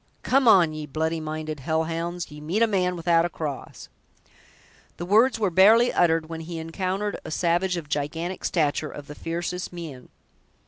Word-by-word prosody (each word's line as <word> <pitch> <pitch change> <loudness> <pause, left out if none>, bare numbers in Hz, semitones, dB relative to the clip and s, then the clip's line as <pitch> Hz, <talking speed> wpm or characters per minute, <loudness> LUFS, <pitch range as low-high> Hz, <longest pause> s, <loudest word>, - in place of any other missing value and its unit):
"Come 265 -1 +3
on, 175 -7 +6
ye 155 -1 -6
bloody 160 +3 -1
minded 155 -1 -5
hell 160 +4 0
hounds! 170 +1 -4
ye 150 0 -10
meet 180 +9 +1
a - - +7
man 185 -4 0
without 170 -1 +2
a 175 - -1
cross!" 150 -5 -6 1.1
The 175 - -5
words 225 +6 +4
were 200 -4 +1
barely 220 +7 +6
uttered, 165 -2 +2
when 165 0 -6
he 165 +1 -6
encountered 185 +5 -3
a - - -7
savage 175 +3 +1
of 160 -3 -6
gigantic 160 +5 -3
stature, 155 -2 0
of 145 - -9
the 150 - -9
fiercest 170 +3 -4
mien. 160 -8 -9
165 Hz, 175 wpm, -25 LUFS, 155-185 Hz, 1.1 s, a